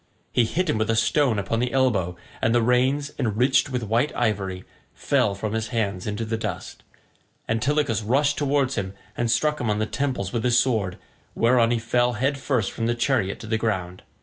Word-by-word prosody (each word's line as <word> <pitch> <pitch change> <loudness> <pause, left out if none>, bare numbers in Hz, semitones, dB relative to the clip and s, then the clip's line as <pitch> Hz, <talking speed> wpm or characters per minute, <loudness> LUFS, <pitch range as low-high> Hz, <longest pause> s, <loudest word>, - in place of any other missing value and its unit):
He 120 - +3
hit 180 +10 -1
him 110 - 0
with 110 0 0
a 115 - +2
stone 115 +2 +2
upon 100 +3 -1
the 125 0 0
elbow, 100 -10 +1 0.2
and 115 +1 +2
the 120 - +4
reins, 130 +4 +2
enriched 125 +4 +2
with 125 -3 -2
white 115 +7 +1
ivory, 95 -5 -1 0.3
fell 125 -8 +1
from 105 +2 -4
his 110 0 -1
hands 100 -5 -2
into 105 +2 -2
the 110 +1 -2
dust. - - -5 0.7
Antilochus 120 +1 +1
rushed 135 +7 +2
towards 140 -2 +1
him 95 -3 -3 0.2
and 120 0 -1
struck 150 +6 +1
him 115 - -1
on 105 - +1
the 110 - 0
temples 125 -7 -2
with 115 -2 -1
his 120 -1 +3
sword, 110 -7 +1 0.4
whereon 115 0 +3
he 120 - +2
fell 120 +2 +1
head 135 +5 -1
first 125 -7 0
from 115 - -2
the 120 - +1
chariot 120 -5 0
to - - -8
the 110 0 -1
ground. 90 -5 -2
115 Hz, 200 wpm, -24 LUFS, 110-130 Hz, 0.7 s, the